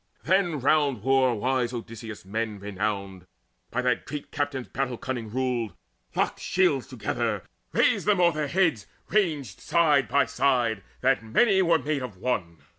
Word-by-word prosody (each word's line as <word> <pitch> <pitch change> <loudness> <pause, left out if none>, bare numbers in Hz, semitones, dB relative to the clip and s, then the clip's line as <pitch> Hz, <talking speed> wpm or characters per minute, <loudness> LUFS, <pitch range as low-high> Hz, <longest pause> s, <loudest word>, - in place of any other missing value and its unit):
Then 175 -3 +2
round 140 -4 +2
war 130 -2 +3
wise 125 +2 0
Odysseus 115 -3 -7
men 110 +1 -3
renowned, 100 -2 -4 0.4
By 125 +1 -1
that 125 -2 0
great 150 -1 -6
captain's 145 -4 -2
battle 130 -2 -2
cunning 120 -4 -4
ruled, 120 -5 -1 0.4
Locked - - 0
shields 175 -9 +1
together, 130 -4 -2 0.3
raised - - +2
them 205 -3 +4
o'er 175 -1 +5
their 150 -2 -2
heads 165 - +1 0.2
Ranged 160 - 0
side 150 -6 +3
by 140 -1 +3
side, 115 -3 +1 0.2
that 135 0 +3
many 190 - +3
were 170 -2 +4
made 150 -2 -2
one. 90 -6 -3
130 Hz, 145 wpm, -26 LUFS, 115-150 Hz, 0.4 s, o'er